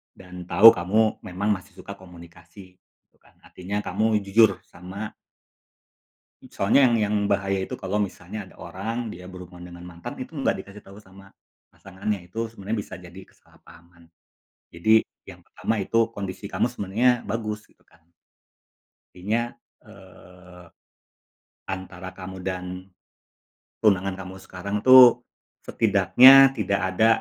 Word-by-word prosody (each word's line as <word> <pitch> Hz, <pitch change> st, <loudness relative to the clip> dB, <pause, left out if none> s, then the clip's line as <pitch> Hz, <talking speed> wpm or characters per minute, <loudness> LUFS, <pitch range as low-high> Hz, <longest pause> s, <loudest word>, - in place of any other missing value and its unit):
dan 90 Hz, -1 st, -11 dB
tahu 110 Hz, +5 st, +8 dB
kamu 110 Hz, +2 st, +1 dB
memang 95 Hz, +4 st, -3 dB
masih 100 Hz, -2 st, -3 dB
suka 100 Hz, +2 st, -11 dB
komunikasi 90 Hz, +1 st, -16 dB
gitu -, -, -43 dB
kan, -, -, -27 dB
artinya 100 Hz, +3 st, -6 dB
kamu 110 Hz, 0 st, 0 dB
jujur 100 Hz, 0 st, +3 dB
sama 95 Hz, +5 st, -9 dB, 1.4 s
Soalnya 125 Hz, +7 st, +3 dB
yang 120 Hz, -, +1 dB
yang 105 Hz, -, -1 dB, 0.2 s
bahaya 95 Hz, -1 st, 0 dB
itu -, -, -6 dB
kalau 100 Hz, +2 st, -2 dB
misalnya 100 Hz, +2 st, -7 dB
ada -, -, -20 dB
orang 115 Hz, +5 st, -5 dB
dia 90 Hz, +1 st, -11 dB
berhubungan 90 Hz, -1 st, -11 dB
dengan 85 Hz, 0 st, -12 dB
mantan 85 Hz, -1 st, -9 dB
itu 130 Hz, +5 st, -8 dB
enggak 135 Hz, -8 st, -1 dB
dikasih 100 Hz, +2 st, -12 dB
tahu 100 Hz, +1 st, -14 dB
sama 100 Hz, -1 st, -18 dB, 0.4 s
pasangannya, 95 Hz, -1 st, -6 dB
itu 115 Hz, +5 st, -5 dB
sebenarnya 110 Hz, 0 st, -5 dB
bisa -, -, -10 dB
jadi 90 Hz, +1 st, -13 dB
kesalahpahaman. 85 Hz, +1 st, -21 dB, 0.7 s
Jadi 110 Hz, +6 st, +3 dB, 0.3 s
yang -, -, -14 dB
pertama -, -, -3 dB
itu 115 Hz, +3 st, 0 dB
kondisi 100 Hz, -1 st, -7 dB
kamu -, -, 0 dB
sebenarnya 110 Hz, +3 st, +1 dB
bagus 105 Hz, -1 st, -5 dB
gitu -, -, -31 dB
kan. 85 Hz, -1 st, -28 dB, 1.1 s
Intinya, 105 Hz, +6 st, -1 dB, 0.4 s
eee, 90 Hz, 0 st, -16 dB, 1.1 s
antara 95 Hz, -1 st, -7 dB
kamu 95 Hz, 0 st, -10 dB
dan 90 Hz, -1 st, -4 dB, 1.2 s
tunangan 95 Hz, -2 st, +2 dB
kamu 95 Hz, 0 st, -9 dB
sekarang 95 Hz, +2 st, -6 dB
itu, 130 Hz, +1 st, +8 dB, 0.5 s
setidaknya 125 Hz, +6 st, +6 dB
tidak 100 Hz, -6 st, -1 dB
ada 110 Hz, +4 st, +3 dB
95 Hz, 130 wpm, -24 LUFS, 90-110 Hz, 1.4 s, tahu